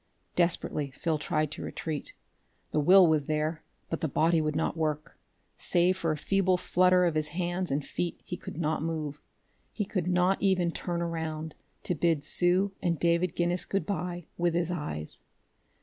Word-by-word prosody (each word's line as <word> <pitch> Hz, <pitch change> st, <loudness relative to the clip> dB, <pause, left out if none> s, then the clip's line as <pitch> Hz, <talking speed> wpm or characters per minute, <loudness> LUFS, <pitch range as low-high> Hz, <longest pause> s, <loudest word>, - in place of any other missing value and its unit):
Desperately 170 Hz, -4 st, +1 dB
Phil 155 Hz, +4 st, -2 dB
tried 155 Hz, 0 st, 0 dB
to -, -, -6 dB
retreat. 155 Hz, -3 st, -5 dB, 0.6 s
The -, -, +1 dB
will 185 Hz, +5 st, +7 dB
was 155 Hz, -4 st, +2 dB
there, 155 Hz, +1 st, -1 dB, 0.3 s
but 165 Hz, -, -3 dB
the 160 Hz, -, +1 dB
body 160 Hz, +3 st, +2 dB
would 155 Hz, -1 st, -1 dB
not 160 Hz, -, 0 dB
work. 155 Hz, -2 st, -2 dB, 0.4 s
Save 180 Hz, +1 st, +3 dB
for 170 Hz, -3 st, -1 dB
a 155 Hz, -, -1 dB
feeble 190 Hz, +3 st, +2 dB
flutter 180 Hz, 0 st, +4 dB
of 170 Hz, -, +2 dB
his 155 Hz, -1 st, 0 dB
hands 175 Hz, +3 st, -2 dB
and 140 Hz, +1 st, -1 dB
feet, 175 Hz, -1 st, -3 dB
he 180 Hz, -, -4 dB
could 170 Hz, -, -9 dB
not 160 Hz, -2 st, 0 dB
move. 155 Hz, -2 st, -3 dB, 0.5 s
He 210 Hz, -, -2 dB
could 185 Hz, -3 st, -2 dB
not 180 Hz, +1 st, +2 dB
even 185 Hz, -3 st, +2 dB
turn 170 Hz, 0 st, -3 dB
around 160 Hz, -2 st, -3 dB, 0.3 s
to -, -, 0 dB
bid 160 Hz, -2 st, +1 dB
Sue 180 Hz, +5 st, +2 dB
and 170 Hz, -3 st, +1 dB
David 170 Hz, +2 st, +1 dB
Guinness 175 Hz, +1 st, +1 dB
good 195 Hz, -, -1 dB
by 175 Hz, -3 st, -3 dB
with 170 Hz, -1 st, +2 dB
his 170 Hz, 0 st, +1 dB
eyes.... 150 Hz, -, -3 dB
170 Hz, 175 wpm, -29 LUFS, 155-180 Hz, 0.6 s, will